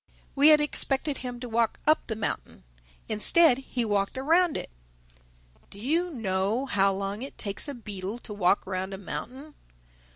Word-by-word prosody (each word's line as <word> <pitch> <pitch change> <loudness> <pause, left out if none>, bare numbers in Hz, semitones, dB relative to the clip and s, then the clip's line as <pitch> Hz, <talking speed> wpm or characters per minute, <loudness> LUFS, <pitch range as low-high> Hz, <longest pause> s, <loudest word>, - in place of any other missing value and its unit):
We 285 +2 +4
had 305 -1 +8
expected 290 -1 +1
him 245 -1 -6
to 250 - -5
walk 230 0 0
up 310 +1 +2
the 220 - -3
mountain; 205 - -4 0.4
instead, 255 +6 +5
he 255 -3 -3
walked 205 +1 -1
around 330 +5 +2
it. - - -6 1.0
Do 200 - -12
you 325 +10 0
know 215 - -1
how 195 -6 +2
long 195 +2 -4
it 270 - -8
takes 200 +6 0
a 285 - -5
beetle 205 -2 -6
to 230 -3 -10
walk 200 -1 +2
round 190 0 -4
a - - -8
mountain? 260 +9 -7
235 Hz, 165 wpm, -27 LUFS, 200-280 Hz, 1.0 s, had